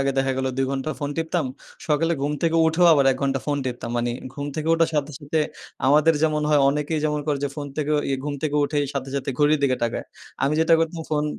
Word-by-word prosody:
আগে 135 0 +1
দেখা 135 0 +1
গেল 130 - -1
২ 135 0 +1
ঘণ্টা 135 +3 -2
ফোন 145 -1 -3
টিপতাম 165 -1 -1 0.4
সকালে 160 +2 +2
ঘুম 145 +1 0
থেকে 165 0 +2
উঠেও 170 +2 +4
আবার 140 -3 +4
১ 130 - -5
ঘন্টা 135 -1 0
ফোন 145 -1 0
টিপতাম। 120 -2 -4
মানে 120 0 0 0.2
ঘুম 145 -1 -4
থেকে 155 +1 -2
উঠার 165 0 +2
সাথে, 150 0 -1
সাথে, 155 +1 -1 0.5
আমাদের 150 +4 +5
যেমন 155 -1 +2
হয় 150 -1 +4
অনেকেই 150 +2 0
যেমন 150 -1 0
করে 145 -2 0
যে, - - 0
ফোন 145 -1 -4
থেকে 150 0 -1
ওই 145 - -1
ঘুম 145 - -2
থেকে 150 -1 0
উঠে 145 +1 -1 0.2
সাথে, 135 -1 -3
সাথে, 140 0 -2
ঘড়ির 150 +1 +4
দিকে 130 -2 +2
তাকায়। 115 - -3 0.4
আমি 140 - +2
যেটা 165 0 +5
করতাম 165 0 -1
ফোন 150 -1 +1
150 Hz, 230 wpm, -23 LUFS, 140-155 Hz, 0.5 s, আমাদের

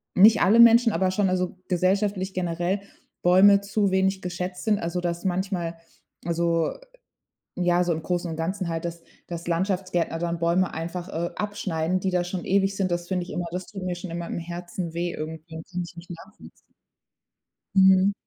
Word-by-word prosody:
nicht 215 +4 +7
alle 220 +5 +5
Menschen, 235 0 +7
aber 190 -1 +1
schon 195 +1 +1
also 185 0 -1
gesellschaftlich 190 +1 +1
generell 175 +2 -1 0.4
Bäume 195 +3 +6
zu 200 0 0
wenig 190 0 +1
geschätzt 180 0 -5
sind. 210 -2 +2
Also, 170 +1 -2
dass 175 +1 -3
manchmal, 180 -2 -2 0.5
also 170 -1 +1 0.8
ja, 175 0 +2
so 175 -1 +1
im 160 - -4
Großen 175 -1 -2
und 160 - -4
Ganzen 185 +3 -2
halt, 165 -1 -3
dass 170 0 -6 0.2
dass 170 -1 -6
Landschaftsgärtner 180 -1 0
dann 170 0 -2
Bäume 170 +2 +1
einfach, 170 +2 -5
äh, 170 +2 -2
abschneiden, 185 -4 -1
die 190 - -1
da 180 -1 +1
schon 175 0 -5
ewig 195 +1 +2
sind. 195 -1 0
Das 175 0 -2
finde 180 -1 -1
ich - - -9
immer 175 - -3
das 180 +1 -5
tut 195 -2 -8
mir 180 -1 -2
schon 175 0 -7
immer 170 0 -4
im - - -4
Herzen 175 0 -6
weh 175 +1 -1
irgendwie. 160 +1 -7
Das 170 - -21
kann 180 0 -2
ich 170 - -14
nicht 170 +1 -11
nachvollziehen. 190 +5 -12 1.2
Mhm. 190 0 +6
180 Hz, 185 wpm, -25 LUFS, 170-190 Hz, 1.2 s, nicht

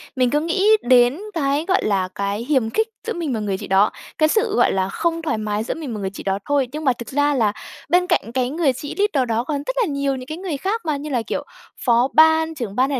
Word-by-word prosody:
Mình 255 -2 +2
cứ 295 - +2
nghĩ 335 +5 0 0.2
đến 245 +3 +4
cái, 290 -1 0
gọi 380 - +2
là, 195 -3 +1
cái 200 +3 -2
hiềm 260 -5 +1
khích 440 - 0 0.2
giữa 460 - -1
mình 325 -6 -3
và 225 - -2
người 200 -2 -2
chị - - -8
đó, 195 +2 +4 0.3
cái 310 0 +3
sự, 435 +1 +1
gọi - - +4
là, 190 0 0
không 330 +9 -1
thoải 315 -9 -1
mái 215 0 -2
giữa - - -3
mình 295 -8 -6
mà 210 - -5
người 190 -1 -2
chị 195 - -9
đó 195 0 -1
thôi. 280 -3 +1
Nhưng 305 +2 -5
mà 260 - +4
thực 235 0 -9
ra 290 +1 +2
là 220 -6 +1 0.4
bên 360 +2 +3
cạnh 345 -10 0
cái 255 -1 0
người 295 -3 +1
chị 290 +3 -7
leader 315 -11 +1
đó 225 +1 +1
còn 290 +2 -2
rất - - -2
là - - +3
nhiều 280 -3 -1
những 255 -1 -8
cái 310 +3 -5
người 360 -6 -4
khác 410 +10 -2
mà, 300 -2 0
như 300 +2 -6
là 250 -4 0
kiểu - - -2 0.4
phó 240 +1 +4
ban, 320 0 +4
trưởng 230 -7 -5
ban 260 +3 +2
hay 275 - -1
275 Hz, 270 wpm, -21 LUFS, 230-320 Hz, 0.4 s, đến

